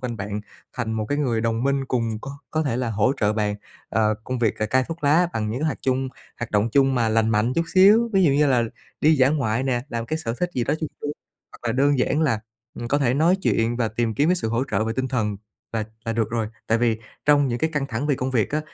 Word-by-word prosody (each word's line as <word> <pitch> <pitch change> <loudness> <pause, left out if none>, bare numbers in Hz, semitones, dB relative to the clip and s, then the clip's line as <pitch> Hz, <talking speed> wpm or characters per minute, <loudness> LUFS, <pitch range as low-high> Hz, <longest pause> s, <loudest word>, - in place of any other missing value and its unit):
quanh 125 -2 -4
bạn 105 0 -4 0.4
thành 110 - -2
một 110 -1 -1
cái 145 - 0
người 120 -6 +1
đồng 115 +1 0
minh 140 0 +1
cùng 115 -4 -1
có 135 - -7 0.2
có 155 0 0
thể 135 -6 -1
là 125 -2 -1
hỗ 110 +5 +2
trợ 105 -1 +3
bạn 105 -1 0 0.3
ờ, 110 0 +2
công 130 0 -3
việc 115 -3 +1
ca 110 - -1
cai 130 +3 +2
thuốc 165 -2 -6
lá 165 +5 +4
bằng 110 -1 -2
những 120 +5 -3
cái 155 - 0
hoạt 150 - -2
chung 130 0 0 0.3
hoạt 120 - -4
động 105 +2 +2
chung 135 -1 +4
mà 115 -3 +2
lành 110 0 +2
mạnh 110 +3 +2
chút 165 - +1
xíu, 210 +5 +6
ví 190 -2 +4
dụ 145 - +5
như 145 +2 +3
là 125 -4 +3 0.4
đi 155 +1 +5
dã 130 -1 +5
ngoại 130 -5 0
nè, 125 -3 0
làm 115 -4 -3
một 115 - -9
cái 155 - -1
sở 115 -7 -3
thích 180 -1 0
gì 125 - 0
đó 145 - +1
vui 155 - -2
vui, 145 - -2 0.4
hoặc - - -14
là - - +1
đơn 140 +2 +2
giản 150 - +1
là, 115 -9 +1 0.4
ừm, 120 - -4
có 145 +4 +2
thể 125 -3 +2
nói 165 +6 +4
chuyện 115 +1 +1
và 115 -2 0
tìm 110 0 -1
kiếm 145 +8 +2
cái 180 - +3
sự 110 - -2
hỗ 115 +3 0
trợ 105 +1 +1
về 110 - -1
tinh 130 0 -1
thần 105 -5 -1 0.4
là 110 -1 -1 0.2
là 115 - -1
được 115 -1 -1
rồi. 115 -2 -1 0.2
Tại 110 - +2
vì 115 -2 +1 0.3
trong 145 -2 +4
những 120 - -2
cái 160 +5 0
căng 145 -3 -1
thẳng 125 +4 -2
về 145 - +2
công 130 0 -2
việc 115 -5 +1
á, 150 - 0
125 Hz, 280 wpm, -23 LUFS, 110-145 Hz, 0.4 s, xíu